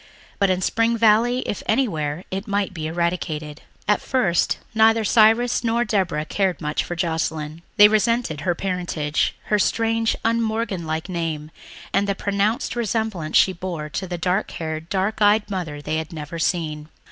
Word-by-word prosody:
But 200 -2 +3
in 185 0 +1
Spring 230 +3 +1
Valley, 230 +3 +4
if 205 - -3
anywhere, 170 - 0
it 195 +3 -4
might 200 -2 -1
be 160 -3 -4
eradicated. 160 -3 -2 0.3
At 210 0 +3
first 215 -10 +1 0.2
neither 225 0 +4
Cyrus 225 +3 +4
nor 235 +1 +1
Deborah 180 -8 0
cared 190 -2 0
much 150 0 -1
for 175 - -5
Joscelyn. 160 -2 -2 0.2
They 210 0 +10
resented 215 - +1
her 175 0 0
parentage, 175 -5 -1
her 210 - +1
strange, 225 +2 +1
un 230 +1 +2
Morgan 220 -6 -2
like 160 +2 -2
name, 160 -4 -3 0.4
and 200 - +2
the 200 - +1
pronounced 205 +5 0
resemblance 220 -8 -1
she 190 - +4
bore 170 -4 -5
to 190 +5 -4
the 175 0 -4
dark 180 +4 0
haired, 160 0 -5
dark 200 +3 -1
eyed 210 0 +4
mother 160 -6 -4
they 155 - -1
had 160 -1 -4
never 155 +1 -6
seen. 155 -3 -1
185 Hz, 165 wpm, -22 LUFS, 160-220 Hz, 0.4 s, They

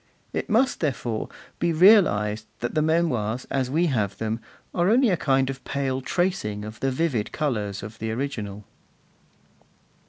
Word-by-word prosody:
It - - -3
must, 240 +5 +2
therefore, 120 -7 -2 0.3
be 170 - +1
realized 135 - +5
that 120 - -2
the 155 - +2
Memoirs, 140 -8 +1
as 130 -2 0
we 160 +6 +2
have 105 - 0
them, 110 +1 -2 0.3
are 175 +1 +2
only 240 0 +4
a - - +3
kind 135 -4 +2
of 135 0 -5
pale 135 -2 -2
tracing 130 - -1
of 110 0 -9
the 135 - +1
vivid 130 -5 -1
colours 105 -10 -2
of 110 +2 -9
the 110 - -3
original. 110 -5 -4
130 Hz, 155 wpm, -25 LUFS, 110-165 Hz, 0.3 s, realized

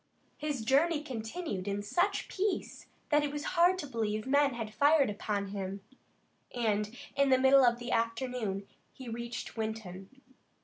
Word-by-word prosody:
His 290 -7 -3
journey 295 +5 +3
continued 225 - -4
in 200 0 -2
such 355 - 0
peace 395 0 -2 0.2
that 295 -1 +4
it 290 - -1
was 295 0 -4
hard 355 +1 +5
to 310 - -4
believe 215 -5 -2
men 280 -1 +3
had 220 -2 -5
fired 285 -2 +4
upon 205 -1 -2
him, 195 0 -4 0.7
and 215 -1 0 0.2
in 280 0 +3
the 260 - +6
middle 265 +1 +6
of 240 -1 +4
the 240 0 -6
afternoon 230 -4 -1 0.2
he 260 -3 -9
reached 235 0 -5
Winton. 220 -4 -5
240 Hz, 150 wpm, -31 LUFS, 215-285 Hz, 0.7 s, the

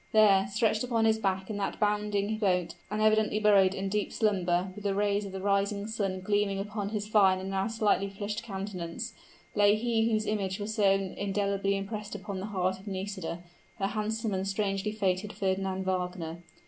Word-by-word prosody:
There, 200 -3 +6
stretched 220 +1 +2
upon 230 -3 +1
his 220 0 +3
back 190 0 -1
in 205 - -3
that 200 - -2
bounding 210 0 0
boat, 180 -5 +1 0.2
and 215 +1 -1
evidently 215 0 +3
buried 200 -3 +5
in 195 +1 -2
deep 210 +1 -1
slumber, 185 -4 +1
with 205 +1 -10
the 200 -1 0
rays 205 0 +1
of 195 - -6
the 190 - -5
rising 200 +1 +1
sun 200 -4 -2
gleaming 205 0 +1
upon 205 0 -3
his 210 -1 -2
fine 195 -3 +5
and 190 +1 -5
now 195 +1 0
slightly 215 -3 +1
flushed 205 +1 -4
countenance, 190 -6 -5 0.4
lay 205 0 +5
he 225 0 +1
whose 215 0 +1
image 195 -2 -1
was 210 +1 -3
so 210 -3 +4
indelibly 200 +1 0
impressed 210 +1 -5
upon 200 -1 -5
the 195 - -4
heart 190 -2 -1
of 195 - -15
Nisida 190 -3 -4 0.3
her 195 - -1
handsome 215 +1 -1
and 190 0 -1
strangely 195 +1 -1
fated 200 -1 -1
Fernand 190 -1 -1
Wagner! 180 -3 -2
200 Hz, 185 wpm, -29 LUFS, 190-210 Hz, 0.4 s, There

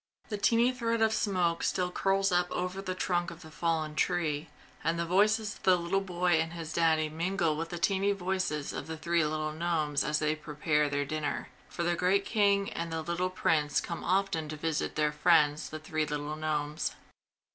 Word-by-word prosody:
The 210 - -2
tiny 235 +4 +4
thread 230 -2 -1
of 220 0 +3
smoke 180 -6 +1
still 180 -1 0
curls 195 +1 +1
up 175 0 +2
over 180 +2 -2
the 185 -1 -4
trunk 175 -1 0
of 170 0 -11
the 160 - -12
fallen 160 -1 -1
tree, 150 -1 0 0.3
and 165 +1 +1
the 170 - -1
voices 210 +4 +2
of - - -23
the 185 - +5
little 180 +3 0
boy 180 -3 +1
and 165 +1 -4
his 165 -2 -6
Daddy 160 -2 +3
mingle 165 +1 0
with 165 +2 -4
the 175 - -5
tiny 195 +3 +2
voices 185 -6 -2
of - - -5
the 160 0 -5
three 170 +1 +1
little 155 0 -1
gnomes 155 -3 0
as 150 +2 +1
they 155 0 +1
prepare 150 -1 0
their 145 0 -1
dinner; 150 0 -3 0.2
for 170 - -3
the 175 0 +1
great 195 +3 +2
King 200 -2 +2
and 170 0 -4
the 160 -1 -2
little 170 +2 -1
Prince 155 -5 +1
come 170 - -5
often 185 -4 0
to 155 - -5
visit 160 0 -2
their 150 0 +2
friends, 150 -1 +3
the 155 - -5
three 155 0 -2
little 150 +1 -3
gnomes. 150 -1 -2
170 Hz, 200 wpm, -30 LUFS, 155-185 Hz, 0.3 s, the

